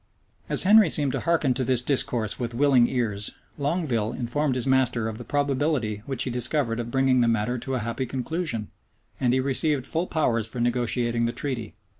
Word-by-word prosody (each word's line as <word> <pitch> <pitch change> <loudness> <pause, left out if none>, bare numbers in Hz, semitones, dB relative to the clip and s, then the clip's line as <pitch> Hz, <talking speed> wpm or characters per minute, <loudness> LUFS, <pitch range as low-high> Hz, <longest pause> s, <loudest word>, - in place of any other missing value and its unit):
As - - +4
Henry 205 -1 +6
seemed 145 -3 +1
to - - -2
hearken 160 -6 +1
to 130 +1 -1
this 125 -1 +2
discourse 120 -5 0
with 120 -1 -4
willing 130 -2 +4
ears, 105 -5 -1 0.3
Longueville 140 -8 -1
informed 130 +3 -1
his 125 - -2
master 130 -4 +1
of 110 0 -6
the - - -7
probability 140 -6 -1
which 135 -3 0
he 130 - -3
discovered 125 -1 0
of 120 0 -4
bringing 130 0 +2
the 120 - +2
matter 115 +2 0
to 135 +3 -4
a - - -1
happy 115 +3 -3
conclusion; 130 - -3 0.5
and 125 -2 +1
he 130 - +2
received 135 +1 +2
full 165 +5 -1
powers 115 -8 0
for 120 - -7
negotiating 120 -1 0
the - - -1
treaty. 120 -3 -5
125 Hz, 190 wpm, -25 LUFS, 115-140 Hz, 0.5 s, Henry